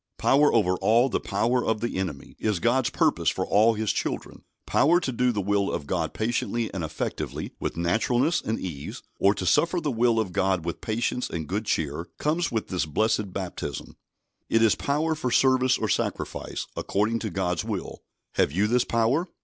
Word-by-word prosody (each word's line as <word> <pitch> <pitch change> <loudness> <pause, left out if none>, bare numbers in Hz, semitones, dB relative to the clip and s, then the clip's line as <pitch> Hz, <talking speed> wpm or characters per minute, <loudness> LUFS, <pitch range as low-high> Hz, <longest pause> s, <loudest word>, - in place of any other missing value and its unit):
"Power 145 +2 +4
over 95 -5 +2
all 120 +4 +3
the - - 0
power 115 +5 0
of 110 -1 0
the 120 - -3
enemy" 85 -8 -5
is 105 -3 0
God's 120 +3 +2
purpose - - +2
for - - -2
all 110 +2 +4
His 110 0 0
children. - - -4 0.2
Power 170 +4 +4
to 135 - -2
do 125 +1 +1
the 105 -4 -2
will 100 0 +1
of 70 - -3
God 80 0 -2
patiently 115 0 -1
and 95 -3 -3
effectively, 80 -1 -4
with - - -3
naturalness 120 - +1
and 110 - -2
ease, 75 -7 -6 0.2
or 100 +1 +4
to 95 - -4
suffer 170 - +3
the 150 -4 -1
will 115 -1 +2
of 105 -5 -1
God 95 -2 0
with 85 - -4
patience 120 +3 -1
and 80 -2 -4
good 105 +4 -2
cheer, 80 -1 -1
comes 165 +3 0
with 110 -2 -2
this 90 -4 -1
blessed 105 +4 0
baptism. 90 -8 -5 0.5
It 115 0 +3
is 110 - +5
power 150 +3 0
for 150 -5 -2
service 130 +1 +3
or 110 - -1
sacrifice, - - -2
according 110 +3 0
to 110 - -3
God's 90 -1 -1
will. - - -5 0.3
Have - - +1
you 95 +7 +1
this 120 +3 +2
power? 120 +10 +1
110 Hz, 190 wpm, -26 LUFS, 95-125 Hz, 0.5 s, is